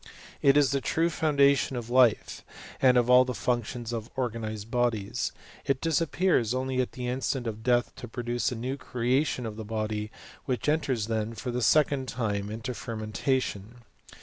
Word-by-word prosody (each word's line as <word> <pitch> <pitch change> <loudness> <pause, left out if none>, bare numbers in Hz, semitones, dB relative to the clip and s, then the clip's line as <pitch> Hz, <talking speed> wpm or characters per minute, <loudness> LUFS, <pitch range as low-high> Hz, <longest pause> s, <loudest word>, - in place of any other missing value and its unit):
It 140 0 +5
is 145 -2 +4
the 140 -1 0
true 165 +5 +1
founda 140 -3 +4
tion 135 -1 -2
of 120 0 -6
life, 125 -3 +3 0.4
and 125 -2 +5
of 120 -1 +3
all 125 0 +7
the 125 -1 -4
functions 120 -1 -2
of 115 -1 -4
organized 110 -4 -4
bodies; 120 -2 0 0.3
it 135 -2 0
disappears 165 - +1
only 130 0 0
at 125 - -4
the 125 -1 -5
instant 130 0 -2
of 110 -1 -4
death 120 +1 +1
to 120 - -7
produce 120 +1 -2
a - - -3
new 125 +4 -3
creation 130 +1 0
of 110 -1 -6
the 110 - -5
body, 110 -1 -3 0.4
which 130 -1 -2
enters 140 -7 +1
then, 110 0 -2
for 125 - -4
the 125 +1 -2
second 140 +1 +3
time, 105 -5 -2
into 115 +4 -4
fermentation. 115 +1 -3
125 Hz, 175 wpm, -28 LUFS, 110-130 Hz, 0.4 s, all